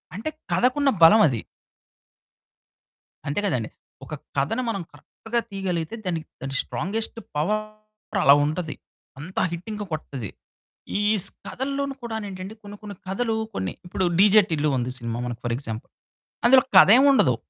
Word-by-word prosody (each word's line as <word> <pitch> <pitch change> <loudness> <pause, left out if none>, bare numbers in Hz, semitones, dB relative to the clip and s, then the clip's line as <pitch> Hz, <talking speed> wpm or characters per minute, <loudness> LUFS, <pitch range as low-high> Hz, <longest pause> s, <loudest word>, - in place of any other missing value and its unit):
అంటే 220 +10 -3 0.2
కథకున్న 275 +3 +3
బలమది. 165 - +6 1.9
అంతే 145 +7 0
కదండీ. 125 - -1 0.4
ఒక 155 - -9 0.2
కథని 155 - 0
మనం 200 -4 -2
కరెక్ట్‌గా 235 +1 -4
తీయగలిగితే, 190 -2 -3
దానికి 165 -3 -3
దాని 135 0 -4
స్ట్రాంగెస్ట్ 220 +7 -3 0.2
పవర్ 215 +4 -3
అలా 140 - +8
ఉంటది. 155 -1 -3 0.4
అంత 180 +7 -10
హిట్ 170 +3 -6
ఇంకా 210 -1 -5
కొడతది. 135 -8 -5 0.7
ఈ - - +1 0.2
స్ 195 - +1 0.2
కథల్లోనూ 275 +1 -3
కూడా 230 -1 -4
ఏంటంటే 190 +2 -7
కొన్ని 205 0 -9
కొన్ని 205 -1 -7
కథలు 225 +4 -1 0.2
కొన్ని, 95 -1 -2
ఇప్పుడు 185 +1 -1
'డీజే 210 +2 +7
టిల్లు' 155 -1 +1
ఉంది 125 +1 -2
సినిమా 115 0 -4
మనకు 120 -2 -5
ఫర్ 120 - 0
ఎగ్జాంపుల్, 110 -5 -7 0.5
అందులో 260 +2 +8 0.2
కథేం 225 +8 +8
ఉండదు, 140 - +4
190 Hz, 135 wpm, -24 LUFS, 145-220 Hz, 1.9 s, అలా